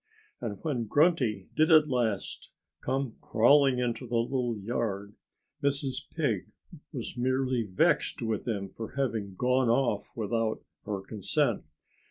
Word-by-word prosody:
And 110 -4 -3
when 130 -7 -1
Grunty 125 - +2
did 155 +2 +4
at 155 -1 +7
last 120 -7 -1 0.3
come 130 -2 -2
crawling 135 +3 +4
into 125 0 -2
the 120 0 0
little 120 -1 0
yard 100 -1 -3 0.5
Mrs. 140 -1 -1
Pig 120 - 0 0.4
was - - -5
merely 130 0 +1
vexed 95 -4 +1
with 110 0 -2
him 100 -4 -2
for 115 +1 -7
having 115 -8 -2
gone 125 +3 +2
off 120 +2 +1
without 115 0 -1 0.2
her 100 -2 -2
consent. 100 -1 -1
120 Hz, 130 wpm, -29 LUFS, 110-135 Hz, 0.5 s, at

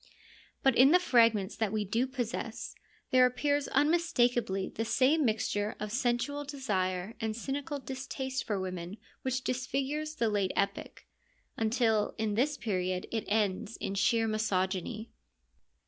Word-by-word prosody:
But 270 -2 +4
in 260 +3 +7
the 360 +4 +6
fragments 230 - +3
that 220 -3 0
we 215 -1 -1
do 230 +6 0
possess 240 -2 -4 0.4
there 255 -1 +6
appears 285 +3 0
unmistakably 245 - +2
the 225 - -3
same 270 +7 +3
mixture 215 -3 0
of 210 0 -4
sensual 245 +4 0
desire 200 -9 -2
and 220 -1 -2
cynical 280 +5 -3
distaste 265 0 -4
for 205 -3 -1
women 185 +1 -5 0.2
which 260 0 -2
disfigures 275 +4 -2
the 235 - +1
late 205 -3 0
Epic; 200 +1 -2 0.5
until 220 -1 +1
in 220 -1 -1
this 280 +7 +1
period 185 -4 -2
it 225 -1 -2
ends 205 0 0
in 195 - -3
sheer 225 +3 +2
misogyny. 215 +1 -1
230 Hz, 135 wpm, -31 LUFS, 205-265 Hz, 0.5 s, in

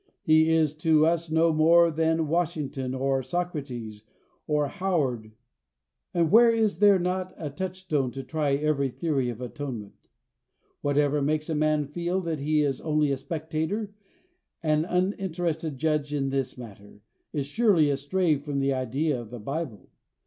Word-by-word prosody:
He 160 0 +4
is 160 -2 +3
to 155 -1 +4
us 165 0 +1
no 160 +1 +3
more 165 +2 +5
than 160 0 +1
Washington 150 -6 -2
or 135 0 0
Socrates, 130 -8 -4 0.4
or 150 -1 +1
Howard. 140 - -1 0.8
And 170 -2 +1
where 235 +1 +7
is 225 -2 +1
there 205 -2 +6
not 185 +1 -2
a 150 -3 -5
touchstone 180 -4 -2
to 135 - -6
try 150 -2 0
every 140 -2 0
theory 135 -3 -1
of 120 0 -6
atonement? 125 -5 -7 0.7
Whatever 145 0 +1
makes 155 +2 -1
a - - +1
man 155 0 +1
feel 175 +5 -2
that 165 -4 -3
he 150 +1 +1
is 140 -2 -1
only 150 -2 +1
a 135 - 0
spectator, 160 +8 -3 0.7
an 155 0 +2
uninterested 175 -5 -1
judge 150 0 0
in 135 -1 -1
this 135 -2 -2
matter, 105 -3 -12 0.3
is 145 -3 -2
surely 165 -3 +3
astray 150 +4 +1
from 145 0 -5
the 135 0 +1
idea 130 +2 -1
of 115 - -11
the 120 0 -8
Bible. 135 0 -5
155 Hz, 150 wpm, -26 LUFS, 135-165 Hz, 0.8 s, where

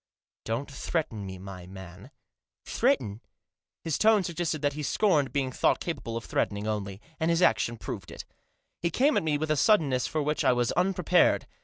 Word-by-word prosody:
Don't 120 +6 -3
threaten 135 - -3
me, 95 0 -7
my 90 -1 -9
man," 95 0 -11 0.3
" - - -64
Threaten? 105 +2 0 0.3
" - - -66
His 160 -3 -1
tone 215 -2 +5
suggested 165 -3 -3
that 145 0 +1
he 150 - -5
scorned 150 -3 +2
being 135 -3 -1
thought - - +2
capable 115 -9 -4
of 115 - -6
threatening 100 0 -1
only, 100 -2 -3 0.2
and 160 - +1
his 170 +1 +2
action 115 -3 +2
proved 100 -5 -7
it. - - -9 0.6
He 170 - +1
came 275 - +2
at - - +3
me 155 -2 0
with 155 +1 -2
a - - +3
suddenness 145 - +3
for 155 -1 -1
which 150 +1 -1
I - - +4
was 120 -1 +1
unprepared. 180 0 +2
140 Hz, 190 wpm, -28 LUFS, 105-165 Hz, 0.6 s, tone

